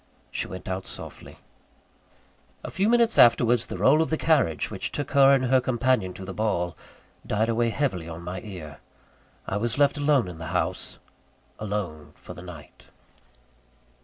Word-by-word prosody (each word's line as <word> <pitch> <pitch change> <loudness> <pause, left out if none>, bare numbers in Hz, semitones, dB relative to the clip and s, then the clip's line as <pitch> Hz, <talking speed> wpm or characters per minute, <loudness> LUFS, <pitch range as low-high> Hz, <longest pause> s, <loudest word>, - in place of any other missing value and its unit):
She - - -2
went 95 -1 -9
out 95 0 -3
softly. - - -8 1.3
A - - -6
few 195 +3 +1
minutes 235 -1 +3
afterwards 120 0 +5
the - - -5
roll 150 +4 +4
of 160 - 0
the 160 - 0
carriage 140 - +1
which - - -4
took 145 - -4
her 140 -1 +6
and 130 -1 0
her 130 +1 +3
companion 125 -5 +1
to 95 - -8
the 95 - -6
ball, 90 -6 -1 0.5
died 110 +2 0
away 115 +1 +1
heavily 110 - -2
on 85 +1 -8
my 90 +1 -5
ear. 80 -9 -9 0.7
I 95 - -2
was 115 +3 -1
left 145 0 +3
alone 145 -6 +3
in 85 -3 -8
the 80 - -6
house - - -2 0.6
alone 100 -8 -4
for - - -11
the - - -10
night. 90 -5 -12
110 Hz, 165 wpm, -26 LUFS, 90-135 Hz, 1.3 s, her